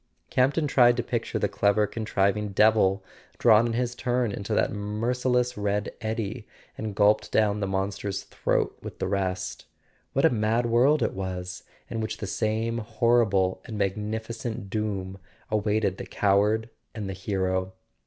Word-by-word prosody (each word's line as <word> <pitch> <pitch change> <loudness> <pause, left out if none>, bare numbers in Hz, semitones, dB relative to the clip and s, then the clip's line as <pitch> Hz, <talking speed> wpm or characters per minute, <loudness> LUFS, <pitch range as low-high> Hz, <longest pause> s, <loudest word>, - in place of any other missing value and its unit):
Campton 140 +5 +2
tried 120 -3 +5
to 120 - 0
picture 115 -1 -2
the - - +1
clever 105 +1 +2
contriving 105 -1 -1
devil 105 -2 +4 0.3
drawn 115 0 +5
in 115 - -2
his 120 +1 -1
turn 125 -2 0
into 100 +2 -6
that - - +2
merciless 125 +4 0
red 105 0 -1
eddy, 110 0 -3 0.3
and 110 -2 -5
gulped 105 +1 +3
down 105 -1 +2
the 100 - -1
Monster's 95 0 -2
throat - - -1
with - - -8
the - - -2
rest. 95 -1 -2 0.5
What - - +3
a - - +5
mad 115 +1 +1
world 125 +6 +4
it - - 0
was, 90 -1 -5 0.3
in 115 - -3
which 110 - -3
the - - -5
same 110 +3 -1
horrible 110 -4 +2
and 110 - -6
magnificent 110 +2 -3
doom 100 -3 -3 0.3
awaited 105 -2 +1
the - - -7
coward 105 +3 +2 0.2
and 105 -3 -4
the 95 - -3
hero! 95 -1 -1
105 Hz, 155 wpm, -26 LUFS, 100-115 Hz, 0.5 s, tried